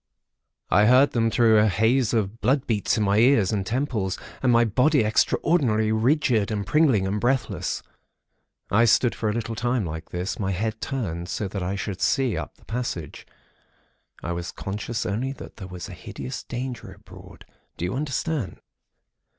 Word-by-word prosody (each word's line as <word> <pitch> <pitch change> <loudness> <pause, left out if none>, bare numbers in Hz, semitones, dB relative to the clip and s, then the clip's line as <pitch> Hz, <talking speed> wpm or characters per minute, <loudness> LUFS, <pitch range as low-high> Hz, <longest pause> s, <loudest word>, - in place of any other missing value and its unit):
I 105 +1 +5
heard 130 +4 +6
them 115 -1 +1
through 110 -1 +4
a 105 - +4
haze 110 +4 +2
of 110 0 -1
blood 135 +1 +2
beats 110 -2 0
in 110 - +1
my 100 +1 +3
ears 115 -5 +4
and 100 -3 0
temples, 110 -4 -2 0.2
and 130 - +3
my 120 0 +5
body 130 +5 +3
extraordinarily 110 -1 +2
rigid 115 -1 +2
and 105 -2 -2
pringling 135 -6 +3
and 100 +2 -2
breathless. 130 +1 -1 0.9
I 110 +4 +5
stood 120 +1 +3
for 110 - -2
a - - 0
little 115 0 -3
time 120 -1 -1
like 80 0 -6
this, 90 +6 -4
my 95 -2 -1
head 110 +4 -3
turned, 90 -10 -3
so 105 - -2
that 100 0 -4
I 90 +2 -2
should 95 -1 -5
see 130 +5 +2
up - - -5
the - - -24
passage. 110 - -5 1.0
I 85 - -3
was 85 -1 -4
conscious 105 +4 -4
only 120 +7 -2
that - - -11
there 95 -4 -8
was 90 -3 -7
a - - -9
hideous 65 -2 -7
danger 125 -2 -6
abroad. - - -15 0.3
Do 85 - -2
you 90 - -2
understand? 145 - -2
110 Hz, 175 wpm, -24 LUFS, 100-125 Hz, 1.0 s, heard